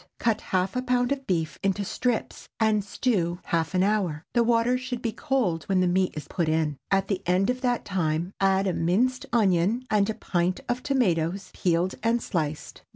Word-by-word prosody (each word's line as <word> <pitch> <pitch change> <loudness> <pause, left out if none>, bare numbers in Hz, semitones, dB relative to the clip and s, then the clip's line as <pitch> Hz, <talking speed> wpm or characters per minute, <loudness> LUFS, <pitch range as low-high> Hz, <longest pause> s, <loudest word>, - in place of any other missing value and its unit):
Cut 225 -2 0
half 185 +2 -1
a 250 - 0
pound 250 0 +1
of 275 -1 -2
beef 165 -4 -1
into 195 +1 0
strips 245 +3 -2
and 215 -2 +2
stew 190 -5 0
half 165 +2 -1
an 185 - +3
hour. 190 -7 0
The 240 - +4
water 235 +1 +3
should 255 -1 -4
be 230 - 0
cold 225 - -1
when 190 -1 +1
the 185 - +3
meat 185 +1 +1
is 150 - -6
put 170 -3 -1
in. 155 -2 0
At 195 0 +2
the 195 -2 -1
end 185 +5 +3
of 250 0 -5
that 245 -2 0
time, 170 -2 -1
add 195 0 +3
a 185 - +1
minced 225 +11 +1
onion 210 +2 +2
and 210 -1 +3
a 220 - -2
pint 175 0 -1
of 245 0 -1
tomatoes 195 - 0
peeled 175 +1 +1
and 230 +2 +2
sliced. 155 -9 -3
195 Hz, 195 wpm, -26 LUFS, 175-235 Hz, -, The